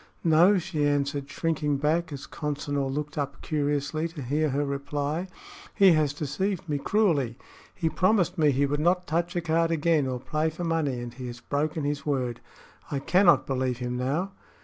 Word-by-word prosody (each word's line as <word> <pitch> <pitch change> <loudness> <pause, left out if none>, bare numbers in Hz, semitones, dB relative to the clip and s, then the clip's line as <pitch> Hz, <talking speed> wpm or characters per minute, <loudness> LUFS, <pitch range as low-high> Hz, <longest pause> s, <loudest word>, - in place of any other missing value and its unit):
"No," 170 +5 +5
she 160 -5 -1
answered, 145 0 -1
shrinking 150 -2 -1
back 160 +4 0
as 140 -1 -6
Consinor 145 -2 -3
looked 150 +2 -3
up 140 -1 -3
curiously 145 +1 -1
to 160 -4 -8
hear 150 +5 0
her 140 +2 0
reply. 145 +4 -2 0.5
"He 195 -2 +7
has 155 -3 +3
deceived 175 +6 -2
me 145 -2 -1
cruelly. 145 - +1 0.4
He 170 - -1
promised 185 +2 +2
me 155 -2 +3
he 140 +1 +2
would 145 +1 -1
not 180 +3 +2
touch 170 +4 -1
a 175 - +1
card 165 0 +1
again, 160 -3 +2
or 130 -1 -3
play 155 +5 -1
for 160 +3 -6
money, 160 -6 0
and 120 -1 -7
he 125 0 -7
has 120 0 -7
broken 150 +4 -2
his 145 0 -2
word. 130 -5 -1 0.5
I 145 - -2
cannot 175 +6 +4
believe 130 -2 -1
him 125 0 -3
now." 145 +10 -1
150 Hz, 180 wpm, -27 LUFS, 140-165 Hz, 0.5 s, He